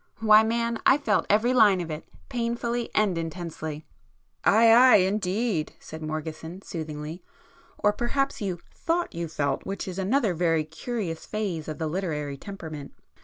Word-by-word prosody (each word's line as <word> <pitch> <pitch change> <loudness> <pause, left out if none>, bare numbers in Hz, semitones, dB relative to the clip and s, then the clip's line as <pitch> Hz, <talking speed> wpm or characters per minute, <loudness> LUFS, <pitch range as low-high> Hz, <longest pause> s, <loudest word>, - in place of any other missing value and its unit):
Why 215 -1 +7
man, 235 +1 0
I 265 - +6
felt 225 -8 +1
every 220 +5 +3
line 210 -6 +6
of 170 -2 -4
it!—painfully 235 - -3
and 210 -4 +3
intensely!" 160 -2 -5 0.6
"Ay, 225 +1 +6
ay 250 +2 +8
indeed!" 195 -2 +1
said 160 0 -9
Morgeson 155 +3 -5
soothingly—"Or 160 +5 -5
perhaps 275 +5 -1
you 190 -4 -2 0.2
thought 340 +1 -1
you 170 0 -3
felt, 145 -3 -1
which 195 0 -5
is 185 0 -5
another 210 +1 +2
very 165 -2 +1
curious 165 +2 -5
phase 195 -8 -3
of 155 - -5
the 160 - -2
literary 155 -4 -2
temperament. 155 -4 -8
190 Hz, 140 wpm, -26 LUFS, 160-225 Hz, 0.6 s, ay